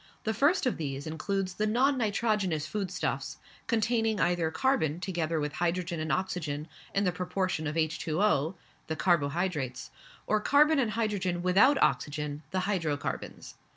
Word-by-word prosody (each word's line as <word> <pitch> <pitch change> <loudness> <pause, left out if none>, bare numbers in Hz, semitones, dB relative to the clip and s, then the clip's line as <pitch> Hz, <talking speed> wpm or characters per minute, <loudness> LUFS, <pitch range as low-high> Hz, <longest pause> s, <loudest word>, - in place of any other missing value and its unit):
The 220 - 0
first 295 - +3
of 250 - +1
these 140 -3 -4
includes 185 +4 -2
the 210 +4 0
non 260 +6 +3
nitrogenous 205 - 0
food 195 +2 -3
stuffs, 180 - -3 0.3
containing 225 -2 +1
either 175 -2 +2
carbon 170 - +1
together 170 -3 -1
with 150 -1 -2
hydrogen 175 0 -1
and 155 0 -2
oxygen 160 -5 -2 0.3
in 200 - +3
the 180 - +2
proportion 180 -2 -2
of 150 - -3
H2O 160 +1 +1 0.3
(the 160 - -2
carbo 155 -4 +2
hydrates), 140 -7 -3 0.3
or 215 0 +1
carbon 300 +4 +4
and 240 -5 +2
hydrogen 195 -6 -1
without 205 +11 +5
oxygen 150 0 -1
(the 185 +2 -1
hydrocarbons). 165 -7 -3
180 Hz, 150 wpm, -29 LUFS, 155-215 Hz, 0.3 s, without